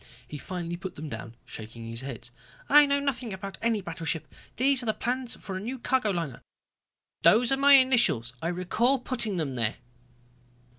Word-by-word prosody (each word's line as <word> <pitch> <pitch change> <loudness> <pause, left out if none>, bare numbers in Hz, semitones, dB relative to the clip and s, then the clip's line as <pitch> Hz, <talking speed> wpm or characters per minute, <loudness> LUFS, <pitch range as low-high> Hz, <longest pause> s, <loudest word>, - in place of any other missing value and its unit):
He 150 - -7
finally 175 0 -5
put 190 0 -7
them 155 +1 -6
down, 115 0 -7
shaking 115 +1 -9
his 115 +1 -4
head. 125 -3 -7 0.4
"I 295 0 +8
know 280 0 +2
nothing 255 -6 -2
about 195 +1 -7
any 230 -2 +1
battleship. 165 -3 -4 0.2
These 265 +1 +3
are 240 - -6
the 220 - +1
plans 250 0 -2
for 190 - -7
a - - -2
new 240 +7 -4
cargo 250 -2 +1
liner. 165 -9 -3 0.8
Those 235 +3 +5
are 270 - +3
my 280 +1 +6
initials, 240 - +4
I 165 - -1
recall 185 +9 +1
putting 235 -6 -3
them 150 -5 -2
there." 115 -3 -1
190 Hz, 180 wpm, -28 LUFS, -, 0.8 s, I